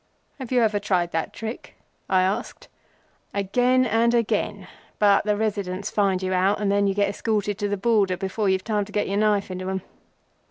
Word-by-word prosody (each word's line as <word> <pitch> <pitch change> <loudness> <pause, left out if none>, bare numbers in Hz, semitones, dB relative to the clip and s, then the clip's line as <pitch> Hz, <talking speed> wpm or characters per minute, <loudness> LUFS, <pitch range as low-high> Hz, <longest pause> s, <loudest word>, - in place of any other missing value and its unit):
"Have 260 -2 -7
you 250 -2 +3
ever 210 -2 +1
tried 180 -4 0
that 165 0 -2
trick?" 225 +2 -7 0.3
I 185 -1 +4
asked. 190 +2 -3 0.7
"Again 245 +6 +2
and 235 +1 +2
again, 210 -4 -1 0.3
but 205 -1 +4
the 210 -1 +1
Residents 200 -2 -2
find 195 -3 +1
you 185 0 -1
out, 190 +3 +2
and 205 -1 0
then 200 0 +2
you 195 - 0
get 200 0 +2
escorted 205 -1 -2
to 205 - -1
the 205 - -1
Border 200 -3 +2
before 195 +2 -1
you've 190 0 +1
time 210 -2 -1
to 210 - -13
get 205 0 -1
your 200 - -1
knife 205 -2 +1
into 185 0 -5
them. 190 0 -3
205 Hz, 195 wpm, -24 LUFS, 190-215 Hz, 0.7 s, I